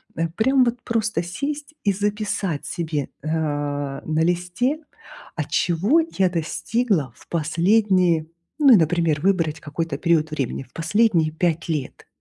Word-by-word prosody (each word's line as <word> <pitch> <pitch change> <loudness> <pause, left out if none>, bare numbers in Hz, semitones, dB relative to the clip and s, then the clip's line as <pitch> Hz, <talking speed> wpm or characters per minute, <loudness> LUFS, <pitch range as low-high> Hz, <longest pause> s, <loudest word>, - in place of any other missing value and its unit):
Э, 165 0 -1
прям 255 +9 +3
вот 240 0 -1
просто 220 -6 0
сесть 285 - -5
и 200 - +3
записать 205 -5 -2
себе, 155 -4 -3
э, - - -7
на 145 -1 -2
листе: 180 - 0 0.6
а - - -1
чего 200 - +2 0.2
я 190 -2 +4
достигла 175 - -1
в - - -19
последние, 170 +1 +2 0.3
ну 275 -4 +7
и, - - +8
например, 165 -2 +2
выбрать 165 -5 +1
какой-то 155 -1 -4
период 160 -2 +1
времени- 135 -3 -3
в 125 - -23
последние 165 -2 +2
5 165 +1 -1
лет. 150 -5 -4
170 Hz, 140 wpm, -22 LUFS, 155-210 Hz, 0.6 s, и